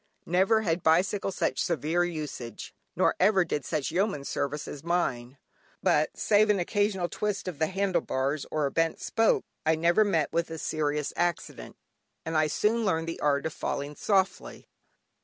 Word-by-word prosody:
Never 190 +6 +3
had 170 -2 0
bicycle 185 +5 +2
such - - -1
severe 170 0 0
usage, 150 -8 -6 0.2
nor - - +3
ever 190 -1 +4
did 150 -3 -2
such 155 -4 -2
yeoman 185 -7 0
service 145 +1 -3
as 145 - -8
mine; 140 -7 -1 0.5
but 150 +1 +2
save 215 0 +3
an 210 - +4
occasional 195 0 0
twist 210 +1 -3
of 170 -5 -5
the 160 - +2
handle 190 -2 0
bars, 135 +2 -2
or 155 -2 0
a 140 - -1
bent 165 0 0
spoke, 225 0 +1 0.2
I 160 +1 +3
never 170 +6 +3
met 170 -7 0
with 170 0 0
a 165 - -6
serious 150 -2 -2
accident, 175 -2 -3 0.5
and 160 - -3
I 155 0 +3
soon 220 +8 +1
learned 165 -5 0
the 165 - -4
art 140 -1 +1
of 160 - -2
"falling 145 +1 -4
softly." 195 +1 -1
165 Hz, 170 wpm, -28 LUFS, 150-190 Hz, 0.5 s, ever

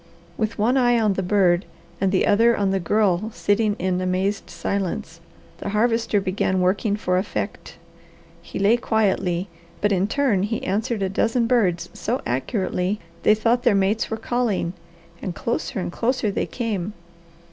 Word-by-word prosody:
With 220 0 -2
one 235 +5 +2
eye 245 -2 +4
on 215 -3 +2
the 190 - -2
bird, 185 -1 +3 0.4
and 195 -1 +2
the 190 - +2
other 230 +3 +4
on 200 -1 +1
the 195 - +1
Girl 200 +2 +1
sitting 205 0 +1
in 185 0 -1
amazed 185 +2 -1
silence, 185 -4 -3 0.4
the - - -4
Harvester 225 0 +2
began 190 -1 0
working 195 +3 +1
for 180 -3 0
effect. 200 +1 -4 0.7
He - - -8
lay 205 +4 +4
quietly, 195 -6 0 0.3
but 205 - +1
in 195 0 +2
turn 240 -5 +1
he 215 +3 -2
answered 215 +2 -1
a - - +1
dozen 225 +5 +1
birds 185 -9 +1
so 245 +5 -2
accurately 185 - -1 0.2
they 210 - +5
thought 230 +3 +2
their 240 -5 +3
mates 200 +3 +1
were 220 - -2
calling, 225 -7 -1 0.5
and 180 - -4
closer 235 -1 -2
and 180 - -3
closer 235 +1 0
they - - -2
came. 210 -5 -3
205 Hz, 160 wpm, -23 LUFS, 185-225 Hz, 0.7 s, they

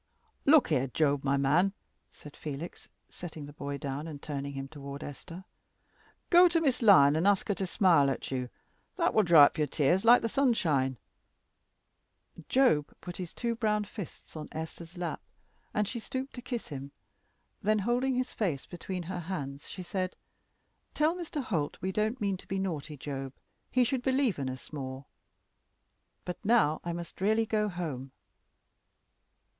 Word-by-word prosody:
"Look 290 -1 +6
here, 135 -4 +2
Job, 145 +1 +1
my 140 0 +2
man," 160 +8 +3 0.4
said 150 - -13
Felix, 150 +3 -7 0.2
setting 160 -4 -8
the 145 - -11
boy 140 -1 -4
down 140 +2 -4
and 150 -3 -7
turning 140 -1 -4
him 135 0 -5
toward 140 0 -8
Esther; 170 +6 -9 0.9
"go 355 0 +8
to 335 -1 +2
Miss 270 -6 +1
Lyon, 160 -8 +6
ask 205 0 +2
her - - +3
to 190 -1 -3
smile 170 -8 +4
at 135 - -4
you, 130 - 0
and 125 - -6 0.5
that 340 -1 +2
will 215 - +5
dry 165 -6 +8
up - - -1
your 150 - +2
tears 150 +6 +2
like 235 +1 +7
the - - +2
sunshine." 160 - +2 1.5
Job 245 - +3
put 175 - -8
his 180 -3 -5
two 235 -1 -2
brown 210 -2 +1
fists 200 -5 -9
on 155 -1 -6
Esther's 160 +2 -7
lap, 175 -1 -3 0.5
and 210 -1 0
she 235 - -4
stooped 260 +4 -5
to 245 - -7
kiss 245 -2 -5
him. 140 -1 -7 0.7
Then 215 +2 +2
holding 245 +5 +1
his 255 0 -1
face 165 -11 -1
between 180 0 -5
her 180 +1 -4
hands 145 -5 -5
she 185 - -6
said, 185 0 -3 0.8
"Tell 305 +2 +3
Mr. 325 -5 -4
Holt 160 - -2
we 190 +1 -2
don't 215 +5 0
mean 200 -2 0
to - - -14
be 195 - -2
naughty, 160 -6 -3
Job. 135 -1 -5 0.4
He 255 - +3
should 250 +1 0
believe 260 - +1
in 135 -2 -2
us 130 +4 -9
more. 130 -2 -5 1.2
But 180 +3 -6
now 210 -9 +3
I 175 - -3
must 170 +1 -7
really 220 +3 +3
go 210 -1 0
home." 150 -8 -5
175 Hz, 170 wpm, -30 LUFS, 145-220 Hz, 1.5 s, go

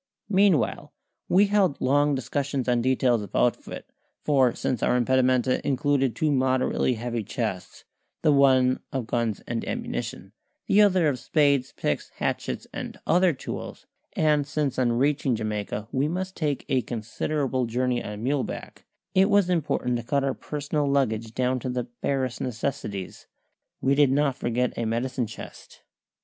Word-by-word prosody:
Meanwhile 190 - +2 0.4
we 195 +3 +5
held 200 -7 +2
long 145 +2 +2
discussions 135 0 -2
on 120 -1 +2
details 125 -2 +2
of 100 -1 -9
outfit, 125 - 0 0.4
for 135 -5 +3
since 125 -4 -2
our 125 - +2
impedimenta 130 0 +2
included 135 -2 +1
two 155 -1 +1
moderately 130 -1 +1
heavy 120 0 -3
chests 105 -3 -4 0.4
the 155 - +5
one 130 -2 +4
of 130 -3 -2
guns 115 -2 -1
and 115 -1 -3
ammunition, - - -4 0.3
the 205 - +4
other 185 -5 +4
of 135 -4 0
spades, 140 0 +2
picks, 75 - -2
hatchets, - - -3
and - - -6
other 180 +1 +4
tools 135 - -7 0.3
and 150 -2 +2
since 150 -3 -1
on 120 -2 +2
reaching 135 0 +1
Jamaica 105 -1 -3
we 135 +2 +1
must 185 +3 -3
take 150 -4 -2
a 135 -3 +2
considerable 125 +3 -2
journey 125 +1 0
on 105 +1 -6
muleback, 135 +1 -3 0.3
it 190 +2 +4
was 200 -3 +3
important 145 -7 0
to 120 - -5
cut 140 +3 0
our 135 -1 0
personal 145 +1 -3
luggage 115 -5 0
down 130 0 +1
to 130 - -4
the 125 0 -1
barest 130 +1 -3
necessities. 115 -6 -4 0.5
We 135 - +3
did 140 -1 +4
not 140 -1 +2
forget 125 +1 -1
a 115 - -2
medicine 120 +2 -1
chest. - - -11
130 Hz, 150 wpm, -26 LUFS, 120-145 Hz, 0.5 s, we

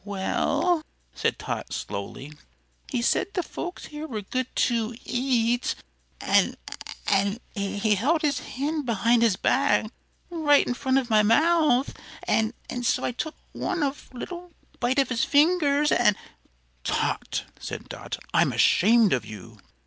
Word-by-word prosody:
"Well," 205 - 0 0.3
said - - -1
Tot, - - -5
slowly, 105 +8 -6 0.6
"he 245 -3 -1
said 385 +10 +1
the 360 - 0
folks 355 +2 -6
here 300 +1 -7
were 215 -7 -5
good 255 +5 -2
to 230 -1 +1
eat; 245 -1 +1 0.4
an' - - +2 0.5
an' 200 +1 +2 0.2
he 205 +1 0
held 295 - +1
his 285 -4 +1
hand 290 +3 -3
behind 230 +1 +3
his 225 -5 +4
back 255 -1 +2 0.4
right 300 -4 +4
in - - -1
front 260 +1 0
of 250 -3 -1
my 215 -1 +6
mouth; 290 +3 +3 0.3
an' 220 +2 +1 0.3
so 240 - +1
I - - 0
took 305 +6 -5 0.2
one 355 -4 -2
of 280 0 -4
little 345 +7 -8 0.3
bite 245 +2 0
off 275 -2 +3
his 250 -2 0
fingers, 295 -1 +3
an' 225 -4 +4 0.4
" - - -40
"Tot," - - -1 0.2
said - - -7
Dot, - - -6 0.2
"I'm - - +3
ashamed 220 -1 +4
of 125 -4 0
you! 105 -3 -11
245 Hz, 145 wpm, -25 LUFS, 215-295 Hz, 0.6 s, my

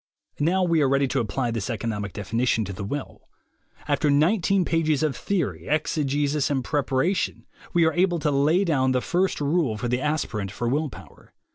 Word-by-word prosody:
Now 175 +5 +2
we 170 -3 +2
are 140 - +3
ready 140 0 +2
to 135 - 0
apply 120 +2 -1
this 115 -2 -3
economic 105 -3 -3
defini 115 +5 -2
tion 110 -2 +2
to 100 - -6
the 100 +2 -6
will. 140 +8 -6 0.6
After 150 - +1
nineteen 180 +5 +3
pages 155 -2 +1
of 150 -4 0
theory, 100 - -2
exegesis 145 -1 0
and 135 -3 0
preparation, 145 +6 0 0.3
we 170 -2 +3
are 160 - +2
able 175 0 +2
to 150 -2 0
lay 150 +7 +3
down 130 -6 +2
the 125 - +1
first 185 +6 0
rule 145 -6 +1
for 120 - -3
the 125 +1 0
aspirant 140 -9 -2
for 120 +4 -4
will 145 +5 0
power. 90 - -15
140 Hz, 185 wpm, -24 LUFS, 120-160 Hz, 0.6 s, are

